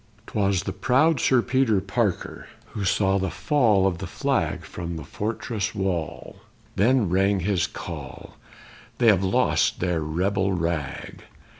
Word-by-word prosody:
'Twas 100 -3 0
the - - -4
proud 140 +4 +2
Sir 125 -2 +3
Peter 130 -6 +2
Parker 100 0 -2 0.2
who 105 - -4
saw 95 +1 +2
the 95 0 -1
fall 110 - +2
of 90 -3 0
the - - -5
flag - - -1
From 85 -1 -6
the 80 - -7
fortress 110 - -3
wall; 95 -5 -3 0.4
then 115 +1 +3
rang 95 +2 +2
his 90 -1 +1
call: - - -8 0.6
_They 120 -2 +5
have 100 -3 +3
lost 95 - +2
their 90 -3 0
rebel 95 +5 0
rag! 85 -5 -3
95 Hz, 140 wpm, -24 LUFS, 90-110 Hz, 0.6 s, They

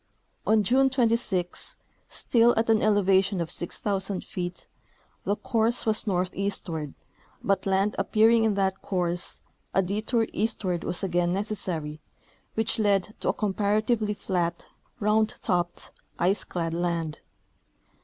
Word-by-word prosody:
On 215 -1 +4
June 265 +6 +4
26, 230 -8 +1 0.3
still 235 0 +3
at 225 0 +3
an 220 - +4
elevation 195 -2 +3
of 170 -1 -2
6,000 195 +2 -1
feet, 175 -1 -5 0.6
the 205 - +1
course 230 +2 0
was 215 0 +1
northeastward, 180 -5 -2 0.5
but 195 0 +1
land 195 +2 +2
appearing 225 +3 +4
in 220 -2 +2
that 190 -1 0
course, 175 -2 -2 0.3
a 195 - +4
detour 215 +5 0
east 220 0 -1
ward 175 -2 -1
was 175 - -2
again 175 -2 +1
necessary, 180 -7 -3 0.5
which 225 +1 0
led 205 -1 +2
to - - -1
a - - +3
comparatively 210 +1 0
flat, 175 -4 -2 0.3
round 215 +1 +2
topped, 175 -4 -1 0.3
ice 185 +3 +2
clad 165 -2 -3
land. 170 -2 -2
195 Hz, 125 wpm, -27 LUFS, 180-215 Hz, 0.6 s, On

